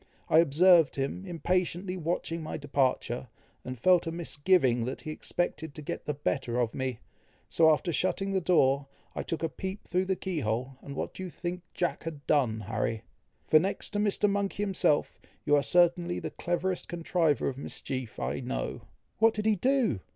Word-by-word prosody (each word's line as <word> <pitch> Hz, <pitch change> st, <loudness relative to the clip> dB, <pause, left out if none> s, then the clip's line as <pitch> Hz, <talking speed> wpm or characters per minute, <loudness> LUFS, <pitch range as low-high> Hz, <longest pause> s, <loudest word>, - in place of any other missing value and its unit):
I 160 Hz, -, +6 dB
observed 165 Hz, +1 st, +5 dB
him 140 Hz, +8 st, -3 dB
impatiently 180 Hz, +1 st, -1 dB
watching 165 Hz, -1 st, -2 dB
my 155 Hz, -, -4 dB
departure, 130 Hz, -3 st, 0 dB, 0.4 s
and 130 Hz, 0 st, -6 dB
felt 175 Hz, +7 st, +4 dB
a -, -, -1 dB
misgiving 145 Hz, -7 st, +2 dB
that 130 Hz, -, -4 dB
he 155 Hz, -, -5 dB
expected 160 Hz, -1 st, -3 dB
to 155 Hz, -, -7 dB
get -, -, -5 dB
the 150 Hz, -, -2 dB
better 130 Hz, -4 st, -1 dB
of 115 Hz, -2 st, 0 dB
me; 130 Hz, -3 st, -3 dB, 0.5 s
so 160 Hz, -1 st, +5 dB
after 165 Hz, +3 st, 0 dB
shutting 195 Hz, +5 st, 0 dB
the 190 Hz, -1 st, +1 dB
door, 140 Hz, -5 st, +3 dB, 0.3 s
I -, -, -3 dB
took 165 Hz, -1 st, -4 dB
a -, -, +3 dB
peep 190 Hz, +6 st, -6 dB
through 180 Hz, +1 st, +1 dB
the 190 Hz, 0 st, 0 dB
key 185 Hz, -3 st, -3 dB
hole, 125 Hz, +2 st, -2 dB
and 140 Hz, -, -8 dB
what -, -, -3 dB
do -, -, -8 dB
you 185 Hz, -, -4 dB
think 175 Hz, +1 st, -5 dB
Jack 175 Hz, -2 st, -1 dB
had 155 Hz, -3 st, -7 dB
done, 120 Hz, -7 st, +2 dB
Harry? 110 Hz, +2 st, -2 dB, 0.4 s
for, 155 Hz, -, +6 dB
next 190 Hz, +5 st, -2 dB
to 205 Hz, -, -1 dB
Mr. 210 Hz, 0 st, +2 dB
Monkey 200 Hz, 0 st, -1 dB
himself, 190 Hz, -7 st, +1 dB, 0.3 s
you 145 Hz, -, +4 dB
are 145 Hz, -, +4 dB
certainly 175 Hz, +2 st, +3 dB
the -, -, -4 dB
cleverest 175 Hz, +1 st, -2 dB
contriver 170 Hz, -3 st, +1 dB
of 135 Hz, 0 st, -3 dB
mischief 130 Hz, -4 st, -5 dB
I -, -, -2 dB
know." -, -, -4 dB, 0.4 s
"What 225 Hz, 0 st, +5 dB
did 210 Hz, 0 st, -2 dB
he 220 Hz, -1 st, +4 dB
do?" 250 Hz, -, +2 dB
165 Hz, 185 wpm, -29 LUFS, 135-185 Hz, 0.5 s, I